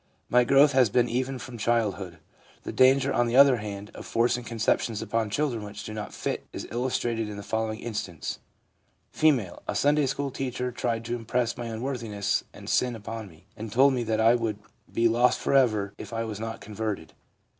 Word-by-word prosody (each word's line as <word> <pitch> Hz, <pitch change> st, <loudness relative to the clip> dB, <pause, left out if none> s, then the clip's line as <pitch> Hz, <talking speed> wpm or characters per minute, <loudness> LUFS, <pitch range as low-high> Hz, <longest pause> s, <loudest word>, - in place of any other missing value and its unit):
My 125 Hz, 0 st, +5 dB
growth 140 Hz, +4 st, +5 dB
has 130 Hz, -4 st, +4 dB
been 120 Hz, +3 st, +3 dB
even 130 Hz, +3 st, -1 dB
from 125 Hz, -2 st, -9 dB
childhood/ 105 Hz, -6 st, 0 dB, 0.5 s
The -, -, -5 dB
danger, 135 Hz, +1 st, +4 dB
on 120 Hz, 0 st, +2 dB
the 120 Hz, -, -1 dB
other 135 Hz, -1 st, +7 dB
hand, 105 Hz, -1 st, -6 dB
of -, -, -9 dB
forcing 120 Hz, +1 st, +1 dB
conceptions 115 Hz, -1 st, 0 dB
upon 115 Hz, 0 st, -1 dB
children 120 Hz, -1 st, -1 dB
which 105 Hz, 0 st, -8 dB
do 110 Hz, -, -6 dB
not 105 Hz, -1 st, -5 dB
fit -, -, -4 dB
is -, -, -6 dB
illustrated 120 Hz, -2 st, -1 dB
in 105 Hz, -, -7 dB
the 100 Hz, -, -7 dB
following 110 Hz, +1 st, -2 dB
instance: 100 Hz, -7 st, -4 dB, 0.7 s
F. -, -, -9 dB, 0.4 s
{ -, -, -36 dB
A -, -, -1 dB
Sunday 145 Hz, 0 st, +3 dB
school 140 Hz, +1 st, -2 dB
teacher 125 Hz, -1 st, -3 dB
tried 115 Hz, -1 st, -2 dB
to 120 Hz, +1 st, -2 dB
impress 120 Hz, 0 st, -1 dB
my 120 Hz, -, -5 dB
unworthiness 115 Hz, -4 st, -2 dB
and -, -, -12 dB
sin 125 Hz, -2 st, +1 dB
upon 110 Hz, 0 st, -6 dB
me, 85 Hz, -1 st, -18 dB
and 110 Hz, 0 st, -7 dB
told 135 Hz, +4 st, +5 dB
me 125 Hz, -2 st, 0 dB
that 110 Hz, 0 st, 0 dB
I 115 Hz, +1 st, +6 dB
would 115 Hz, -3 st, -1 dB, 0.3 s
be 115 Hz, 0 st, +3 dB
lost 120 Hz, +2 st, +3 dB
for -, -, -1 dB
ever 110 Hz, -7 st, +3 dB
if -, -, -8 dB
I 115 Hz, 0 st, -2 dB
was 110 Hz, -2 st, -5 dB
not 115 Hz, 0 st, -5 dB
converted. 105 Hz, -5 st, -4 dB
115 Hz, 200 wpm, -27 LUFS, 110-125 Hz, 0.7 s, other